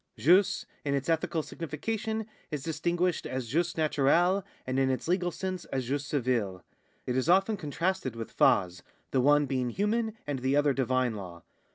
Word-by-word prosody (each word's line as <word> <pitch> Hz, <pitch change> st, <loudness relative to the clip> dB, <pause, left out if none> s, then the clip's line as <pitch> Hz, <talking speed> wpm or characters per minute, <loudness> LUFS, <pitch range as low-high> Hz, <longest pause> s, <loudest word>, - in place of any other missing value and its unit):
Jus, 180 Hz, +7 st, +4 dB, 0.2 s
in 140 Hz, -1 st, 0 dB
its 140 Hz, +3 st, -2 dB
ethical 160 Hz, 0 st, 0 dB
signification, 220 Hz, +9 st, -3 dB, 0.2 s
is 150 Hz, -3 st, -4 dB
distinguished 170 Hz, +2 st, 0 dB
as 130 Hz, -2 st, -4 dB
jus 170 Hz, +6 st, +1 dB
naturale, 165 Hz, +5 st, +3 dB, 0.2 s
and 130 Hz, +1 st, -1 dB
in 135 Hz, 0 st, +3 dB
its 130 Hz, +3 st, -2 dB
legal 180 Hz, 0 st, +1 dB
sense 185 Hz, 0 st, -4 dB
as 130 Hz, -2 st, -3 dB
jus 140 Hz, +1 st, -2 dB
ririle. 115 Hz, -9 st, 0 dB, 0.4 s
Jt 125 Hz, -, 0 dB
is 130 Hz, +5 st, 0 dB
often 195 Hz, +4 st, +4 dB
contrasted 170 Hz, -, -2 dB
with 115 Hz, -1 st, -7 dB
/«.s', 90 Hz, -2 st, +3 dB, 0.3 s
the 130 Hz, -, +2 dB
one 145 Hz, +2 st, +5 dB
being 130 Hz, -3 st, -1 dB
human 220 Hz, -, -1 dB
and 145 Hz, -2 st, -2 dB
the 130 Hz, +2 st, +1 dB
other 145 Hz, -1 st, +3 dB
divine 130 Hz, -2 st, +1 dB
law. 90 Hz, -5 st, -8 dB
145 Hz, 170 wpm, -29 LUFS, 130-175 Hz, 0.4 s, one